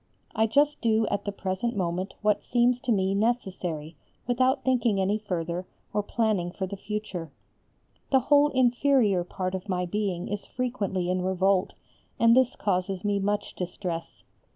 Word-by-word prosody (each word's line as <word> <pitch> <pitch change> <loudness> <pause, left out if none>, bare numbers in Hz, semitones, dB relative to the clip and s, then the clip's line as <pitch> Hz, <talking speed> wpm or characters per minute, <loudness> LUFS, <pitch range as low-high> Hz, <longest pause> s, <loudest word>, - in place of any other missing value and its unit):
I 220 +1 +2
just 290 +5 +2
do 220 -1 +3
at 200 - -2
the 205 - -1
present 200 +4 -2
moment 185 0 -2
what 210 -1 +2
seems 245 0 +2
to 245 - -1
me 190 -2 +2
necessary 190 -8 -1 0.3
without 255 +3 +2
thinking 240 -6 +2
any 200 +3 +1
further, 180 -3 -3 0.3
or 210 - +2
planning 210 -4 0
for 190 +2 -4
the 195 +2 -6
future. 195 -5 -5 0.8
The 265 -2 +4
whole 290 +3 +5
inferior 250 -6 +3
part 185 +1 -4
of 190 +2 -5
my 180 -1 0
being 185 -2 -2
is 205 0 -4
frequently 205 -8 -2
in 185 0 0
revolt, 190 +1 +1 0.5
and 230 0 +6
this 255 -1 +3
causes 185 0 -1
me 205 -1 +1
much 205 +1 -1
distress. 175 -2 -5
200 Hz, 155 wpm, -27 LUFS, 185-235 Hz, 0.8 s, and